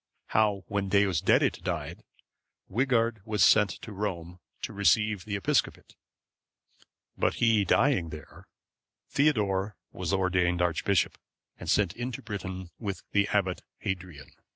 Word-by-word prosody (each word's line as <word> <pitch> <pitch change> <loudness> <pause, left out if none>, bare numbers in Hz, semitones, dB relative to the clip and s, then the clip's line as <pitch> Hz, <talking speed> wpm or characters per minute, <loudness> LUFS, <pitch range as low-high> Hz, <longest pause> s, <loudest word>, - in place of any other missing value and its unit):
How 105 -3 +2
when 100 -1 -2
Deusdedit 100 -4 +2
died, - - -4 0.7
Wighard 115 -1 +1
was 105 -2 +1
sent 105 -2 +6
to 110 - -7
Rome 90 -4 -4 0.2
to - - -4
receive 105 0 +2
the 105 -2 -3
episcopate; 100 - -1 1.2
but - - +1
he 115 -3 +3
dying 100 - +2
there, 75 -1 -11 0.6
Theodore 105 -9 +1 0.2
was - - -4
ordained 90 -2 +1
archbishop, 90 +2 +1 0.4
and - - -6
sent 100 -5 +2
into 120 0 -5
Britain 95 -4 -6
with 100 -4 -4
the 100 0 +3
Abbot 95 -3 0 0.2
Hadrian. 90 -7 -6
100 Hz, 120 wpm, -28 LUFS, 90-110 Hz, 1.2 s, sent